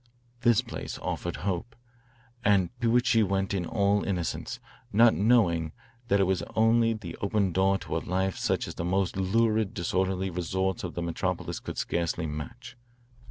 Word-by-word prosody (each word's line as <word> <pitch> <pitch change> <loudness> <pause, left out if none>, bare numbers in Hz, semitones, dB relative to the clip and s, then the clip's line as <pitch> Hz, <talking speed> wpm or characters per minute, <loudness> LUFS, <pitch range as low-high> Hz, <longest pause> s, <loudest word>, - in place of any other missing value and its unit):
This 120 -2 +4
place 115 - -6
offered - - -3
hope, 100 +4 -2 0.7
and 100 -4 +3
to 120 0 +4
it 125 - +1
she 115 -4 +4
went 95 -1 0
in 90 -3 -1
all 100 -1 +2
innocence, 90 -4 -3 0.3
not 115 +2 +6
knowing 90 -8 +2 0.3
that 100 -1 +3
it - - +5
was 95 -2 +1
only 115 +1 +4
the 95 -7 -7
open 100 -2 0
door 95 +2 +3
to - - -4
a - - +1
life 95 +1 -1
such - - -1
as - - -6
the - - -4
most 95 +1 0
lurid 110 +2 +1
disorderly 95 +2 -1
resorts 95 +1 -1
of 90 - -5
the 85 - -2
metropolis 85 -1 -2
could - - -7
scarcely 85 -1 -1
match. 75 -3 -7
95 Hz, 165 wpm, -28 LUFS, 90-110 Hz, 0.7 s, not